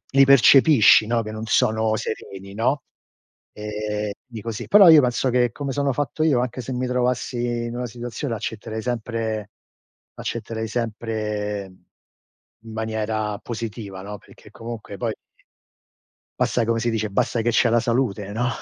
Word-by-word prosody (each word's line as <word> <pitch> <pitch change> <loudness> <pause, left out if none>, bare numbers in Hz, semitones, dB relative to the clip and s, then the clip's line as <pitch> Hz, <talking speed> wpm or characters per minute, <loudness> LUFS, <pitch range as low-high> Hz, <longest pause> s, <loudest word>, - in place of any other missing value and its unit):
li 135 0 +7
percepisci, 135 -4 +7
no, 115 0 +1
che 110 - -6
non 110 +1 -6
sono 110 -2 +2
sereni, 100 -2 -6
no, 120 +7 0 0.7
ehm, 105 0 -3 0.2
di 115 -3 -8
così 115 -2 -5
però 200 -3 +8
io 155 - +9
penso 125 +1 +1
che 120 -1 +2
come 140 +1 -4
sono 140 0 0
fatto 145 +3 -2
io, 140 -6 +3
anche 125 0 -3
se 130 - -6
mi 125 +1 -1
trovassi 125 0 -1 0.3
in 120 +1 -5
una 125 - -3
situazione, 120 +2 -5
l'accetterei 110 +1 -5
sempre 115 -3 -3 0.6
accetterei 115 -1 -4
sempre 105 -3 -3 1.0
in 115 - -10
maniera 110 -1 -2
positiva, 110 -4 -6
no, 105 +1 -7
perché - - -18
comunque 115 -3 -8
poi 115 -3 -2 1.2
basta 120 - +1
come 115 0 0
si 120 +1 0
dice, 110 -1 -2
basta 115 +4 0
che 120 - +2
c'è 115 +1 +3
la 115 +1 +3
salute, 115 -4 -1
no? 120 +4 0
115 Hz, 150 wpm, -23 LUFS, 110-125 Hz, 1.2 s, io